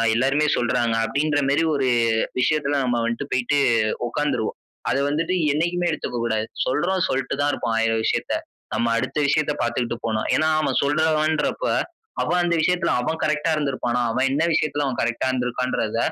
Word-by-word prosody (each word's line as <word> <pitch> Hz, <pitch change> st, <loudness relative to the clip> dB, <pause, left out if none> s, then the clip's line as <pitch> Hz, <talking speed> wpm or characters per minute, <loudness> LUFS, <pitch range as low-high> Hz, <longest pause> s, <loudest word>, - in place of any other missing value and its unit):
எல்லாருமே 135 Hz, +5 st, +2 dB
சொல்றாங்க," 120 Hz, -1 st, +1 dB
அப்படின்ற 145 Hz, +6 st, 0 dB
மேரி 145 Hz, +4 st, +2 dB
1 135 Hz, -2 st, +1 dB, 0.5 s
விஷயத்துல 145 Hz, 0 st, +1 dB
நம்ம 120 Hz, -1 st, 0 dB
வந்துட்டு 120 Hz, +5 st, -3 dB
போயிட்டு 130 Hz, +3 st, +1 dB, 0.5 s
உக்காந்துருவோம். 145 Hz, -4 st, -2 dB, 0.3 s
அத -, -, +1 dB
வந்துட்டு 165 Hz, +4 st, -1 dB, 0.2 s
என்னைக்குமே 175 Hz, +4 st, 0 dB
எடுத்துக்க 125 Hz, -5 st, -4 dB
கூடாது. 110 Hz, -1 st, -1 dB, 0.2 s
சொல்றவ 175 Hz, +9 st, 0 dB
சொல்ட்டு 135 Hz, 0 st, -1 dB
தான் 145 Hz, -, +2 dB
இருப்பான், 115 Hz, -, -2 dB
1,000 115 Hz, 0 st, +2 dB
விஷயத்த. -, -, 0 dB, 0.4 s
நம்ம 115 Hz, 0 st, +1 dB
அடுத்த 115 Hz, -, -3 dB
விஷயத்த 150 Hz, +1 st, +2 dB
பாத்துட்டு 120 Hz, 0 st, -1 dB
போணு. 110 Hz, -1 st, -1 dB, 0.2 s
ஏனா 155 Hz, -, +2 dB
அவன் 140 Hz, -4 st, 0 dB
சொல்றவன்றப்ப 155 Hz, -, +1 dB, 0.6 s
அவன் 180 Hz, -, +1 dB
அந்த 170 Hz, -1 st, +1 dB
விஷயத்துல 180 Hz, +1 st, +1 dB
அவன் 160 Hz, +6 st, -2 dB
கரெக்ட்டா 155 Hz, +2 st, +1 dB
இருந்துருப்பானா? 130 Hz, -5 st, -1 dB
அவன் 130 Hz, +3 st, +1 dB
என்ன 150 Hz, +4 st, +1 dB
விஷயத்துல 150 Hz, -2 st, 0 dB
அவன் 130 Hz, -3 st, -2 dB
கரெக்ட்டா 120 Hz, +2 st, -1 dB
இருந்துருக்கான்றத 125 Hz, -3 st, -1 dB
140 Hz, 155 wpm, -23 LUFS, 120-155 Hz, 0.6 s, எல்லாருமே